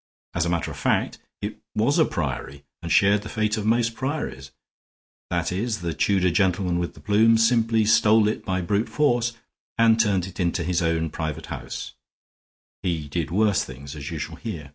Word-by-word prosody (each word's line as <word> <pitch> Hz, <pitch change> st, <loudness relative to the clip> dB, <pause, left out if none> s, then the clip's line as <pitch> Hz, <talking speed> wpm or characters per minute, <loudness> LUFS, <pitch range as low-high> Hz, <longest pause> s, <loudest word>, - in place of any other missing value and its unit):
As 85 Hz, -1 st, 0 dB
a -, -, 0 dB
matter 85 Hz, -1 st, -1 dB
of -, -, -9 dB
fact, -, -, 0 dB, 0.2 s
it -, -, -4 dB, 0.2 s
was 120 Hz, +10 st, +2 dB
a 160 Hz, -, +6 dB
priory, 70 Hz, -, -4 dB, 0.2 s
and 85 Hz, -1 st, -5 dB
shared 100 Hz, +1 st, +4 dB
the -, -, -8 dB
fate 110 Hz, -1 st, 0 dB
of 105 Hz, -1 st, -3 dB
most 115 Hz, 0 st, +2 dB
priories 130 Hz, -, -4 dB, 0.8 s
that -, -, -1 dB
is, 110 Hz, +4 st, -2 dB
the 85 Hz, -1 st, -2 dB
Tudor 95 Hz, -3 st, +2 dB
gentleman 90 Hz, -2 st, +1 dB
with 85 Hz, -, -3 dB
the -, -, -13 dB
plumes 115 Hz, +2 st, +4 dB
simply 115 Hz, -2 st, +2 dB
stole 110 Hz, 0 st, +5 dB
it 105 Hz, -, -2 dB
by 95 Hz, -1 st, -1 dB
brute 100 Hz, +5 st, 0 dB
force 120 Hz, -5 st, +1 dB, 0.4 s
and 115 Hz, -1 st, +5 dB
turned 100 Hz, -5 st, +2 dB
it 95 Hz, 0 st, -10 dB
into 85 Hz, -1 st, 0 dB
his 90 Hz, +1 st, 0 dB
own 80 Hz, -1 st, 0 dB
private 80 Hz, -3 st, -4 dB
house; -, -, -7 dB, 0.9 s
he 80 Hz, -4 st, -2 dB
did 80 Hz, +1 st, -2 dB
worse 105 Hz, +2 st, +2 dB
things, 70 Hz, +3 st, -9 dB
as 75 Hz, -1 st, -6 dB
you -, -, -4 dB
shall -, -, -5 dB
hear. 85 Hz, -11 st, -6 dB
95 Hz, 185 wpm, -24 LUFS, 85-110 Hz, 0.9 s, a